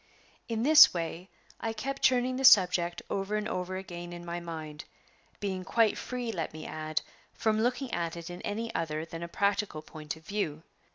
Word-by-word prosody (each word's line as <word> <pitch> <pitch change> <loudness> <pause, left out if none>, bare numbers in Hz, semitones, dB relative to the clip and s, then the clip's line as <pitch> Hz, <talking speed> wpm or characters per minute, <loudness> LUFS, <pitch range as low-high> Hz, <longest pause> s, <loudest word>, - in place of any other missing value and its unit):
In 230 -1 -1
this 305 -5 +9
way 170 +2 -4 0.3
I 225 -1 -2
kept 275 +4 -4
turning 255 0 +3
the 270 - -2
subject 180 -7 +5
over 195 +2 -2
and 210 0 -1
over 185 -2 -3
again 175 -2 -7
in 175 0 -8
my 170 0 -3
mind, 160 -3 -7 0.5
being 190 -2 -3
quite 225 +2 +3
free, 245 -2 -4
let 170 -7 -4
me 155 - -8
add, 155 0 -3 0.3
from 220 -1 +1
looking 250 +2 -1
at 170 -1 -2
it 170 -1 -7
in 175 0 -7
any 225 +3 -3
other 155 -1 -2
than 165 0 -8
a 170 - -4
practical 200 -3 0
point 155 -1 -7
of 160 0 -17
view. 165 -6 -2
185 Hz, 185 wpm, -30 LUFS, 165-225 Hz, 0.5 s, this